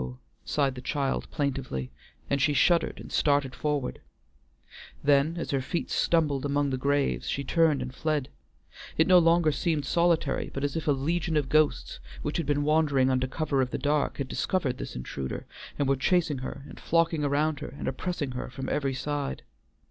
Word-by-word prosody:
sighed 140 -3 0
the 125 - -8
child 140 0 -1
plaintively, 130 - -3 0.4
and 140 -1 0
she 150 - +3
shuddered, 170 +3 +3
and - - -10
started 140 -3 +2
forward; 145 -3 -2 1.0
then, 145 +3 +3
as 170 - -3
her 135 -2 +1
feet 165 +6 -3
stumbled 150 -5 +2
among 145 0 +1
the - - 0
graves, 140 +1 0
she 140 - -1
turned 155 -3 +2
and 125 0 -7
fled. 150 -1 -1 0.7
It 160 - +5
no 185 0 +7
longer 165 -1 +4
seemed 150 -1 -1
solitary, 170 -2 +1
but 135 - -4
as 145 -1 -1
if 160 - -3
a - - +5
legion 160 +4 0
of 145 -3 0
ghosts 155 -1 +2 0.2
which - - -2
had 170 - -2
been 145 0 +1
wandering 145 -4 +3
under 130 0 +1
cover 140 -1 0
of 125 - 0
the - - -3
dark 150 0 0
had 140 - -3
discovered 140 -8 -1
this - - -6
intruder, 65 +1 -5 0.3
and 140 - +1
were 135 - +3
chasing 155 0 +1
her 135 +1 -6
and - - -11
flocking 165 -2 +1
around 145 +1 +1
her - - -5
and - - -5
oppressing 145 0 -2
her 125 - -5
from 130 +1 -5
every 135 -2 0
side. 145 +1 -3
145 Hz, 185 wpm, -28 LUFS, 135-155 Hz, 1.0 s, no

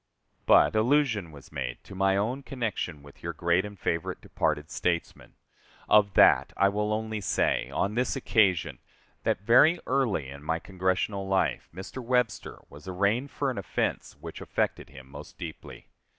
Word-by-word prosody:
But - - +6
allusion 115 - +2
was 70 -2 -14
made 60 -3 -5
to - - -12
my 95 0 +2
own 120 +7 -1
connection 110 - -4
with 70 -1 -16
your 85 0 -4
great 85 +3 +1
and 105 -1 -8
favorite 85 -2 -2
departed 75 0 -2
statesman. 85 -2 -3 0.5
Of 100 -3 +4
that - - +5
I 100 - +4
will 105 +1 -1
only 110 0 -2
say, - - 0
on 100 - -1
this 125 +4 0
occasion, 105 -9 +2 0.5
that - - +1
very 145 - +5
early 125 - 0
in 70 +1 -10
my 80 +2 -1
Congressional 95 +2 -2
life 95 0 0
Mr. 95 +9 -8
Webster 125 -3 0
was 75 +5 -14
arraigned 100 +9 0
for 140 0 -1
an 115 - -4
offense 100 - -3
which - - -9
affected - - -2
him 65 -1 -13
most 70 - -11
deeply. - - -9
100 Hz, 160 wpm, -28 LUFS, 85-115 Hz, 0.5 s, But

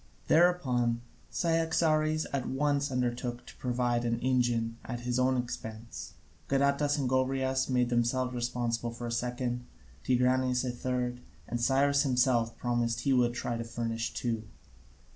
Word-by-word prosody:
Thereupon 130 -9 +3 0.3
Cyaxares 160 -2 +1
at 135 -3 -1
once 145 +1 +1
undertook 120 -1 -2
to - - -12
provide 120 -1 0
an 115 -1 0
engine 120 -3 +1
at 120 -1 -5
his 125 +1 -1
own 130 0 +3
expense, 115 -2 -6 0.4
Gadatas 140 +2 +2
and 135 -3 0
Gobryas 130 +1 +1
made 125 -1 +2
themselves 125 +1 +1
responsible 120 -1 -1
for 120 +1 -7
a 120 - -3
second, 125 +1 -2 0.4
Tigranes 125 0 +2
for 130 - -1
a - - 0
third, 125 0 -2 0.3
and 120 0 -3
Cyrus 140 +3 +3
himself 125 -4 +2
promised 120 -1 0
he 135 - +2
would 120 -1 +3
try 120 -1 -2
to 115 - -3
furnish 115 -1 -3
two. 115 -3 -2
125 Hz, 145 wpm, -30 LUFS, 120-130 Hz, 0.4 s, Thereupon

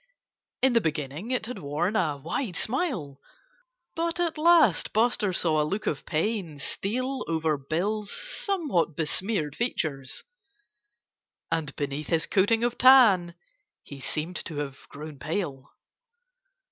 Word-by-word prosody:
In 265 -1 +5
the 230 - +4
beginning 155 - -3
it 250 -3 -1
had 250 +2 -6
worn 155 +8 -1
a 155 -9 +1
wide 180 - -3
smile. 220 - -1 0.8
But 335 +1 -1
at 340 -2 0
last 320 - +5
Buster 220 -2 +2
saw 160 -3 +2
a - - +2
look 195 +8 -3
of 145 - -2
pain 170 -1 -1
steal 255 - -3
over 160 -1 +1
Bill's 195 +9 -2
somewhat 320 - -1
besmeared 160 -1 0
features. 145 - -2 1.3
And 160 -3 -1
beneath 145 +1 -3
his 165 -2 +1
coating 225 +4 +2
of 240 0 -1
tan 215 -10 +6 0.5
he 140 - -10
seemed 155 +6 -3
to 160 - -6
have 140 -2 -6
grown 150 -1 -9
pale. 150 -4 -3
175 Hz, 130 wpm, -27 LUFS, 150-235 Hz, 1.3 s, tan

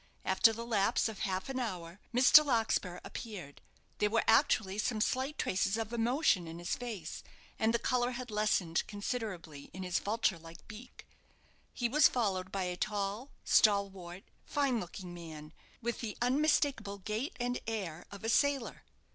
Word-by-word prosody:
After 190 +4 +5
the 230 +1 -6
lapse 210 -3 +2
of 220 -3 -7
half 190 -2 -2
an 265 -1 -3
hour, 180 -6 -5
Mr. 255 +5 +8
Larkspur 225 -9 0
appeared. 185 - -8 0.4
There 210 - +3
were 230 +1 +2
actually 210 -3 +3
some 220 0 0
slight 260 +6 0
traces 195 +3 0
of 225 0 -4
emotion 235 - +2
in 165 +1 -7
his 175 0 -2
face, 215 -10 -6 0.4
and 220 +1 +3
the 235 - +2
colour 245 +1 +1
had 245 -1 -6
lessened 210 -5 +1
considerably 200 - -5
in 190 - -6
his 180 -1 0
vulture 210 -4 0
like 165 +1 -13
beak. 230 +4 -11 0.7
He 240 - -1
was 300 +5 +6
followed 190 -6 -1
by 195 -1 -1
a 180 0 -2
tall, 205 +6 -2
stalwart, 195 -3 +2 0.2
fine 275 -5 0
looking 180 -1 -7
man, 160 -3 -9 0.3
with 235 0 -2
the 220 -3 -5
unmistakeable 265 -5 +1
gait 215 - -4
and 245 0 -1
air 185 -7 -4
of 200 +1 -10
a 225 - -1
sailor. 280 0 +1
215 Hz, 160 wpm, -33 LUFS, 185-240 Hz, 0.7 s, Mr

